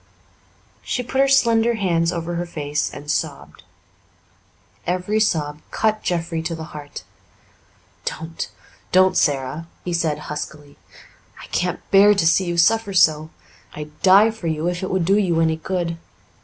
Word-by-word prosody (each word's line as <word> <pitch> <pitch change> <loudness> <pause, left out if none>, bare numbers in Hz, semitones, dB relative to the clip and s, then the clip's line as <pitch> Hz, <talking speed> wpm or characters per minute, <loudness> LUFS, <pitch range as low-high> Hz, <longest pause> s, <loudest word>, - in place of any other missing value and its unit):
She 250 - -3
put 265 +2 0
her 275 - +4
slender 235 -3 +3
hands 170 -5 +1
over 170 -1 -4
her 175 +1 -3
face 150 -2 -2
and 145 +1 -5
sobbed. 155 -2 -4 1.3
Every 185 +4 0
sob 150 -8 0
cut 215 -1 0
Jeffrey 170 -2 -2
to 165 +1 -3
the 160 - -7
heart. 145 -1 -8 1.0
"Don't 160 +1 -5 0.4
don't, 185 0 +4
Sara," 140 +3 0 0.2
he 175 - -2
said 165 -3 0
huskily. 150 -1 -7 0.6
"I - - -10
can't 180 0 -2
bear 205 +2 +7
to 185 -4 +1
see 180 +3 +3
you 175 -1 -2
suffer 210 +4 +3
so. 155 -2 +4 0.5
I'd 150 0 -7
die 200 +4 +6
for 220 -6 -7
you 160 +1 -1
if 180 0 -2
it 190 - -3
would 185 -2 0
do 195 +4 +3
you 175 -5 +1
any 160 -1 +2
good. 170 -1 -3
170 Hz, 155 wpm, -21 LUFS, 155-195 Hz, 1.3 s, bear